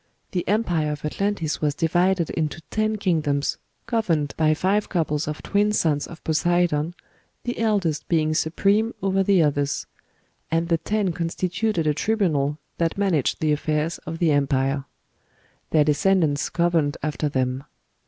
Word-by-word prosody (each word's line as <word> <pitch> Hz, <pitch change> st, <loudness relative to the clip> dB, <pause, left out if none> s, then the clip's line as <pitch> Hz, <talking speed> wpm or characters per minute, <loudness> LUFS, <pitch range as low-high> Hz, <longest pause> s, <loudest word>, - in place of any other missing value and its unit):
The 180 Hz, -, -2 dB
empire 175 Hz, -8 st, +1 dB
of 150 Hz, 0 st, -7 dB
Atlantis 180 Hz, -1 st, -1 dB
was 145 Hz, -2 st, +1 dB
divided 175 Hz, +2 st, +1 dB
into 155 Hz, -1 st, -2 dB
ten 215 Hz, 0 st, +1 dB
kingdoms, 155 Hz, -8 st, 0 dB, 0.3 s
governed 165 Hz, -11 st, 0 dB
by 155 Hz, -1 st, +3 dB
five 200 Hz, +5 st, +1 dB
couples 150 Hz, -4 st, -1 dB
of 150 Hz, 0 st, -5 dB
twin 205 Hz, +1 st, +2 dB
sons 155 Hz, -8 st, +1 dB
of 165 Hz, -, -12 dB
Poseidon, 170 Hz, 0 st, +1 dB, 0.5 s
the 245 Hz, -, -3 dB
eldest 200 Hz, -9 st, 0 dB
being 155 Hz, -2 st, +2 dB
supreme 200 Hz, +8 st, +1 dB
over 195 Hz, 0 st, +2 dB
the 190 Hz, -3 st, +4 dB
others; 145 Hz, -1 st, 0 dB, 0.6 s
and 165 Hz, +1 st, 0 dB
the 165 Hz, -1 st, +2 dB
ten 205 Hz, -2 st, 0 dB
constituted 175 Hz, +2 st, -1 dB
a 150 Hz, -, +3 dB
tribunal 150 Hz, -6 st, 0 dB, 0.2 s
that 165 Hz, +1 st, 0 dB
managed 185 Hz, -9 st, +1 dB
the 155 Hz, -1 st, +2 dB
affairs 155 Hz, +2 st, -1 dB
of 165 Hz, -, -6 dB
the 165 Hz, -2 st, +2 dB
empire. 135 Hz, -1 st, +1 dB, 0.8 s
Their 155 Hz, -2 st, +4 dB
descendants 155 Hz, -1 st, +2 dB
governed 170 Hz, -4 st, +1 dB
after 150 Hz, 0 st, -1 dB
them. 130 Hz, -1 st, -1 dB
165 Hz, 145 wpm, -24 LUFS, 150-190 Hz, 0.8 s, the